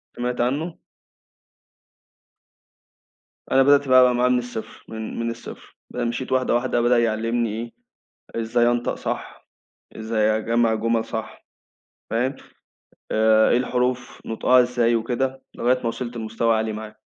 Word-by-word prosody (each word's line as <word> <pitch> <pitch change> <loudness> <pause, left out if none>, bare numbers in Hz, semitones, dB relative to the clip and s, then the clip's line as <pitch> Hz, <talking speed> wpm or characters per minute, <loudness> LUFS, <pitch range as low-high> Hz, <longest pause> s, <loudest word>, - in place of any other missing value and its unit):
سِمعت 125 0 -2
عنه؟ 150 +7 -1 2.8
أنا 135 0 +5
بدأت 140 0 +4
بقى 130 -1 +6
معاه 125 +1 +2
من 125 - +3
الصفر، 120 -2 -8
من 110 0 -6
من 115 0 -1
الصفر، 115 - -11
ب - - -10
مشِيت 120 +2 -2
واحدة 130 -2 +2
واحدة 120 -1 +1
بدأ 120 0 +3
يعلّمني 115 0 -1 0.6
إيه 115 - -1
إزاي 120 +1 +2
أنطق 120 0 0
صح، - - -6 0.5
إزاي 110 -1 +1
أجمّع 115 +1 +1
جُمل 115 +1 0
صح 110 0 -7 0.7
فاهم؟ 125 +4 0 0.8
آآ، 110 0 +4
إيه - - +4
الحروف 125 0 -2
نُطقها 125 +3 +4
إزاي 120 -1 +1
وكده، 130 +3 -2
لغاية 125 +2 +1
ما - - -8
وِصلت 120 0 -4
لمستوى 115 +1 0
عالي 110 0 -2
معاه. 110 0 -8
120 Hz, 135 wpm, -23 LUFS, 110-125 Hz, 2.8 s, بقى